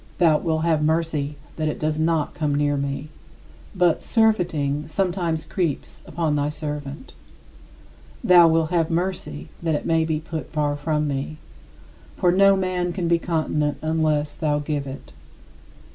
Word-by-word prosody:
Thou 160 -4 +4
wilt 160 -1 -1
have 160 -2 +2
mercy 155 -2 0 0.2
that 155 -1 -1
it 150 - -3
does 155 0 -1
not 160 -1 +1
come 150 -3 -1
near 145 0 +1
me. 140 +1 -3 0.7
But 180 -3 +2
"surfeiting" 165 - +1
sometimes 170 -2 -1
creeps 170 -7 -3
upon 160 -3 -1
thy 145 0 0
servant. 150 - -6 1.1
Thou 180 -6 +7
wilt 160 0 +2
have 165 -2 +2
mercy 170 - -3
that 165 -2 0
it - - -3
may 165 0 +2
be 160 -1 -1
put 160 -3 -6
far 150 -2 0
from 150 +1 -1
me. 140 +2 -3 0.8
For 175 - +3
no 195 +2 +5
man 180 -2 -1
can 180 -2 -2
be 170 0 +3
continent 155 -3 -1
unless 155 -2 0
thou 150 -2 0
give 145 -1 -3
it. 135 - -9
155 Hz, 150 wpm, -23 LUFS, 150-170 Hz, 1.1 s, Thou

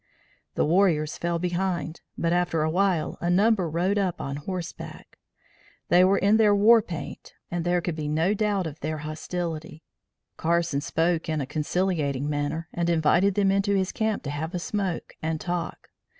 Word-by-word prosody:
The - - +2
warriors 160 -3 +2
fell 170 0 -1
behind, 175 -1 -2 0.2
but 170 0 +1
after 175 -3 +1
awhile, 175 +1 0
a 175 - 0
number 195 -1 +3
rode 180 +6 +1
up 185 -3 -1
on 140 +1 -4
horseback. 175 +3 -7 0.7
They 180 +1 +6
were 195 +2 +4
in 205 +3 +4
their 210 -2 +5
war 220 +3 +6
paint 170 -8 -8 0.2
and 175 -1 -1
there 175 0 +1
could 170 -1 -3
be 155 -2 -4
no 160 +6 +1
doubt 205 -3 0
of 155 -1 -6
their 155 +1 -3
hostility. 160 0 -5 0.5
Carson 170 -3 +1
spoke 165 +2 0
in 155 -1 0
a 140 - -2
conciliating 150 -2 -1
manner 150 +2 -2
and 170 0 0
invited 170 +4 +3
them 195 -2 +3
into 200 +1 +2
his 190 -1 0
camp 220 -1 -1
to 140 - -4
have 160 +5 -4
a - - +1
smoke 190 -1 -3
and 160 0 -2
talk. 175 0 -4
175 Hz, 170 wpm, -26 LUFS, 155-190 Hz, 0.7 s, They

